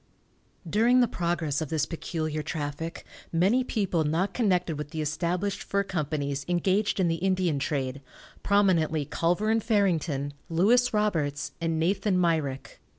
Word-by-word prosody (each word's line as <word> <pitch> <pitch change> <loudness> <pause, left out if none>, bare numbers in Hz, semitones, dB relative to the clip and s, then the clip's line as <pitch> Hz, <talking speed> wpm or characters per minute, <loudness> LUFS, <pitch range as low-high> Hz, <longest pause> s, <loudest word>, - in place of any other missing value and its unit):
During 230 +8 +4
the 245 - +4
progress 170 - -1
of 155 - -3
this 155 -2 0
peculiar 155 -2 -3
traffic 150 +2 -5 0.3
many 195 +10 +3
people 195 -9 0
not 165 +6 0
connected 180 -8 +1
with 150 0 -5
the 160 - -6
established 170 +6 -1
fur 200 0 0
companies, 145 -6 -2
engaged 190 +4 +1
in 185 - +3
the 165 0 0
Indian 185 -5 +1
trade, 135 -1 -2 0.4
prominently 170 -7 +2
Culver 180 +9 0
and 225 -1 +1
Farrington, 165 - +1 0.2
Louis 230 +9 +3
Roberts, 150 -9 0
and 165 -1 0
Nathan 190 +3 +1
Myrick. 155 -6 -1
170 Hz, 140 wpm, -27 LUFS, 150-200 Hz, 0.4 s, During